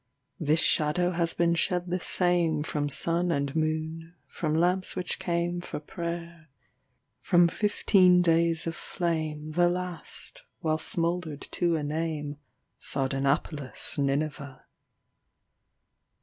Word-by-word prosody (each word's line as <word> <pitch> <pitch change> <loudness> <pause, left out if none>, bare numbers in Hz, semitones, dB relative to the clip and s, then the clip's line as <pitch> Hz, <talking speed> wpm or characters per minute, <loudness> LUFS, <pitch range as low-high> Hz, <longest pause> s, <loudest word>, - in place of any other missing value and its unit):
This 155 -1 +2
shadow 175 +4 +2
has 170 -1 0
been 170 0 +2
shed 175 +1 0
the 180 - 0
sameFrom 160 -5 +1
sun 170 +4 +2
and 140 -2 -1
moon,—from 155 -1 -3
lamps 180 +3 +2
which 180 - -2
cameFor 175 -3 -2
prayer,—from 170 -2 -3
fifteen 185 -2 +4
days 165 -1 +3
of 165 0 -3
flame, 155 -4 -3
The 175 +2 +3
last, 180 -1 -5 0.2
while 155 -1 0
smouldered 170 -3 0
to 170 -1 +1
a 150 - -3
nameSardanapalus' 145 -2 -3
Nineveh. 140 -1 -2
165 Hz, 95 wpm, -28 LUFS, 150-175 Hz, 0.2 s, fifteen